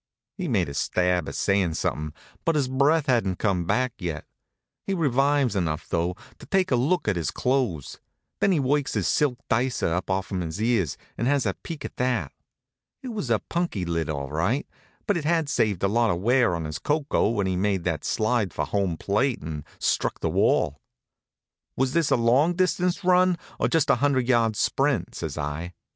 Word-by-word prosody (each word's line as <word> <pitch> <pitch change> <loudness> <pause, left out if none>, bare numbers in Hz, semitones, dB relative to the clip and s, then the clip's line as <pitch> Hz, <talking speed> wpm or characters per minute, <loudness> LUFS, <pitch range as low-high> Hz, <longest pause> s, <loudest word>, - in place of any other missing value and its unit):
He 185 -3 -4
makes 95 - +1
a - - -7
stab 90 +3 0
at - - -7
sayin' 95 -5 +1
something, 75 -1 -2 0.3
but 165 - +1
his 140 -4 +1
breath 140 +4 +2
hadn't 115 -9 +1
come 95 -5 0
back 125 +6 +1
yet. 85 -6 -4 0.6
He 195 - 0
revives 140 - +2
enough 80 -5 -1
though, 85 +2 -1 0.2
to - - -12
take 190 -3 +1
a - - +5
look 145 +6 +1
at 105 - +2
his 80 -4 -1
clothes. 125 - -1 0.4
Then 200 - +3
he 170 - +2
works 140 +1 0
his - - 0
silk 140 -5 +2
dicer 120 -7 +1
up 90 +3 -2
off'm 95 0 -1
his 80 +2 -5
ears, 110 - +1 0.2
and 120 - 0
has 140 -2 +2
a 100 - +1
peek 160 -3 -7
at - - -8
that. 125 - 0 0.7
It 260 - -5
was 210 - -4
a 115 -2 +1
punky 170 - -1
lid, 85 -3 -2
all 70 -2 -3
right, 90 - 0 0.4
but 205 - +1
it 165 - -3
had 165 0 +1
saved 105 -10 0
a - - +4
lot 115 +3 +2
of 85 - 0
wear 120 -2 +3
on 80 -1 -4
his 75 0 -5
koko 150 -7 +1
when 105 -4 0
he 95 -1 0
made 95 -1 0
that 80 -4 -2
slide 110 -3 0
for 75 - -1
home 95 +1 -1
plate 115 - 0
and 75 -2 -5
struck - - 0
the - - -1
wall. 70 - +2 1.0
"Was 130 0 +1
this 170 -3 +2
a - - +4
long 130 +9 +3
distance 180 +1 +1
run, 180 0 +4 0.2
or - - +2
just 165 -4 +2
a - - +3
hundred 130 -3 +1
yard 115 -4 +3
sprint?" 135 +3 0
says 80 -4 -5
I. 75 +4 -4
115 Hz, 195 wpm, -25 LUFS, 90-145 Hz, 1.0 s, a